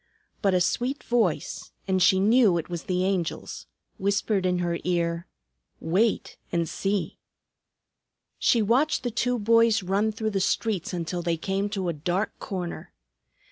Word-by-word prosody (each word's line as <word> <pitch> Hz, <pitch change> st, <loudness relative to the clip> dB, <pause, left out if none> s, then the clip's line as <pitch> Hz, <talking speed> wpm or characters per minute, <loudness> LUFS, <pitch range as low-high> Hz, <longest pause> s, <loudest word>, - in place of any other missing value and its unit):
But 195 Hz, -3 st, +3 dB
a 180 Hz, -, +3 dB
sweet 255 Hz, +9 st, 0 dB
voice 225 Hz, -9 st, -1 dB
and 190 Hz, -1 st, +1 dB
she 185 Hz, +1 st, +5 dB
knew 210 Hz, -2 st, +4 dB
it 165 Hz, -, -4 dB
was 170 Hz, -2 st, -5 dB
the 185 Hz, 0 st, 0 dB
Angel's 185 Hz, -4 st, -3 dB, 0.3 s
whispered 200 Hz, 0 st, +1 dB
in 180 Hz, 0 st, +1 dB
her 175 Hz, -1 st, -1 dB
ear, 170 Hz, -1 st, -1 dB, 0.5 s
"Wait 195 Hz, +7 st, 0 dB
and 170 Hz, -1 st, 0 dB
see!" 195 Hz, +4 st, -2 dB, 1.2 s
She 230 Hz, -3 st, +3 dB
watched 260 Hz, +9 st, +2 dB
the 245 Hz, -, -1 dB
two 245 Hz, +2 st, 0 dB
boys 230 Hz, -1 st, +4 dB
run 200 Hz, +4 st, +1 dB
through 220 Hz, 0 st, -2 dB
the 195 Hz, -, 0 dB
streets 190 Hz, 0 st, 0 dB
until 175 Hz, 0 st, -3 dB
they 170 Hz, -1 st, 0 dB
came 195 Hz, +4 st, -1 dB
to 195 Hz, -3 st, -3 dB
a 170 Hz, -, 0 dB
dark 175 Hz, +6 st, -1 dB
corner. 180 Hz, -4 st, -5 dB
195 Hz, 150 wpm, -26 LUFS, 175-220 Hz, 1.2 s, she